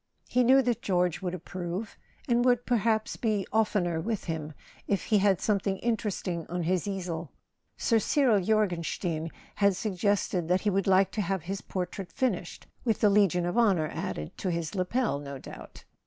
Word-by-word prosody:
He 250 - +2
knew 265 +2 +6
that 240 -2 0
George 180 -4 +1
would 180 -1 -2
approve, 180 +3 -5 0.3
and 240 -1 +3
would 245 -1 +3
perhaps 225 -2 +1
be 215 -4 0
oftener 190 -7 +1
with 220 +2 -2
him 155 -2 -4 0.3
if 200 - 0
he 210 -3 +3
had 195 -2 +3
something 200 -2 0
in¬ 235 -1 +2
teresting 185 -5 -4
on 175 0 -2
his 180 +2 0
easel. 175 -5 -4 0.5
Sir 230 -2 +2
Cyril 235 -3 +3
Jorgenstein 175 -5 0 0.3
had 200 -1 +4
sug¬ 205 +3 -3
gested 200 -4 +1
that 180 +2 +2
he 210 - +1
would 195 0 0
like 190 0 +4
to 215 - -1
have 190 -3 -2
his 195 +3 -4
portrait 180 0 -5
finished 195 -8 -2 0.2
—with 225 -4 +1
the 210 - +4
Legion 195 -4 +3
of 175 +7 0
Honour 185 -9 +3
added 75 0 -4
to 190 - -1
his 170 -2 -2
lapel, 195 - 0
no 140 -1 -7
doubt. - - -11
195 Hz, 180 wpm, -28 LUFS, 175-220 Hz, 0.5 s, knew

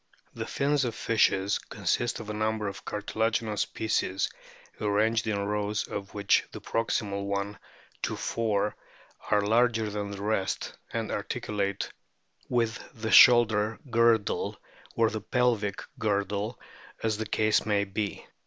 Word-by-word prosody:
The - - -5
fins 145 0 +1
of 120 -3 -2
fishes 100 -4 +2
consist 120 0 -1
of 110 - -8
a - - -4
number 110 0 -1
of 95 -1 -6
cartila 110 +2 -1
ginous 110 -2 -1
pieces 100 -3 0 0.5
arranged 110 +2 +1
in 105 -2 0
rows 105 0 -1
of 100 0 -6
which 100 -1 +3
the - - -7
proximal 100 -3 -1
one 100 +1 -2 0.4
to - - -1
four 105 -2 0 0.5
are 105 - +4
larger 110 0 +2
than 100 0 -3
the 100 0 -6
rest, 105 -2 -1 0.2
and - - -2
articulate 100 -2 -2 0.6
with 115 -2 +1 0.2
the 110 0 -2
shoulder 110 -1 +7
girdle 115 -2 +2 0.4
or 115 -1 +3
the 110 - -4
pelvic 115 -4 0 0.2
girdle 100 +1 -1 0.4
as 110 -2 +1
the 110 - -2
case 110 0 +2
may 105 -2 +2
be. 100 +1 -4
105 Hz, 135 wpm, -28 LUFS, 100-115 Hz, 0.6 s, shoulder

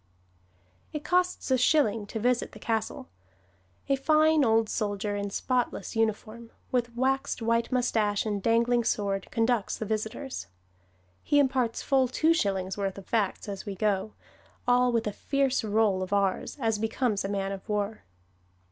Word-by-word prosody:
It 300 -1 -4
costs 360 -4 0
a 260 - +4
shilling 230 -7 +2
to 220 - -4
visit 245 +2 0
the - - -10
castle. 225 -2 -2 0.8
A 275 - +3
fine 310 +2 +4
old 225 -2 +3
soldier 205 -1 -2
in 200 0 -2
spotless 245 -1 -2
uniform, 225 +1 -2 0.2
with 240 -2 -1
waxed 270 +2 0
white 230 +1 0
moustache 220 -5 +1
and 205 -2 -2
dangling 235 +2 +2
sword, 200 -3 -1
conducts 230 -2 0
the 220 - -4
visitors. 220 - -4 0.7
He 290 - +1
imparts 260 -4 +1
full 265 -2 +3
two 315 +6 +2
shillings' 195 - -1
worth 195 -1 -2
of 195 - -9
facts 215 -4 -1
as 200 0 -6
we 200 - -4
go, 210 +1 0 0.5
all 250 0 +4
with 230 -1 0
a 210 - -2
fierce 275 0 0
roll 210 -3 +2
of 185 - -4
r's, 200 +4 0
as 225 -4 0
becomes 225 -1 0
a 195 - -3
man 195 -1 -2
of 195 +2 -8
war. 210 +1 -2
225 Hz, 155 wpm, -28 LUFS, 205-250 Hz, 0.8 s, a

